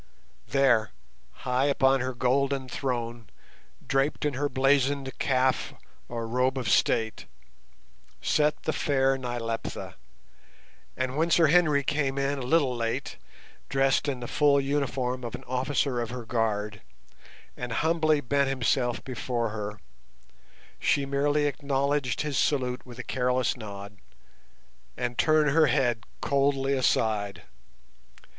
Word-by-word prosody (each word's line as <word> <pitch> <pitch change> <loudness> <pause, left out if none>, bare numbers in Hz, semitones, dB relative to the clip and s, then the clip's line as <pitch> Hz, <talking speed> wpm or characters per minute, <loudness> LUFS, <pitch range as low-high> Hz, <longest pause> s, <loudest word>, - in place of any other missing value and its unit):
There, 120 -4 +3 0.5
high 125 +1 +2
upon 135 -1 +3
her 130 0 -3
golden 135 +2 +1
throne, 120 -4 -4 0.6
draped 135 +3 0
in 150 - 0
her 145 +3 -1
blazoned 135 0 +2
"kaf" 130 -1 +1 0.3
or 115 -1 -4
robe 125 +3 +1
of 125 -4 -3
state, 110 +2 +1 0.9
sat 150 0 +1
the 155 - -1
fair 135 -2 +2
Nyleptha, 120 -3 -4 1.0
and 130 0 -2
when 165 +2 +2
Sir 165 0 +5
Henry 150 -4 +4
came 140 -2 -1
in 140 0 0
a - - -5
little 130 0 +2
late, 115 -1 -3 0.5
dressed 135 +1 +2
in 130 -3 -2
the 120 - -5
full 145 +1 +3
uniform 135 -2 -1
of 120 0 -4
an 130 - -10
officer 130 0 -1
of 115 - -3
her 120 -1 -6
guard 105 -3 -1 0.7
and 125 -1 -5
humbly 155 +2 +2
bent 140 +1 +1
himself 125 -1 0
before 120 -2 -2
her, 105 -1 -5 1.0
she 140 - +1
merely 145 +2 +1
acknowledged 140 -1 0
his 150 -2 -1
salute 125 -3 0
with 120 -1 -11
a 130 - -5
careless 125 -1 0
nod 100 -3 -9 1.0
and 120 -1 -3
turned 155 -2 +4
her 155 +1 +5
head 120 -4 +1 0.2
coldly 140 -1 +1
aside. 105 -7 0
130 Hz, 125 wpm, -27 LUFS, 120-140 Hz, 1.0 s, Sir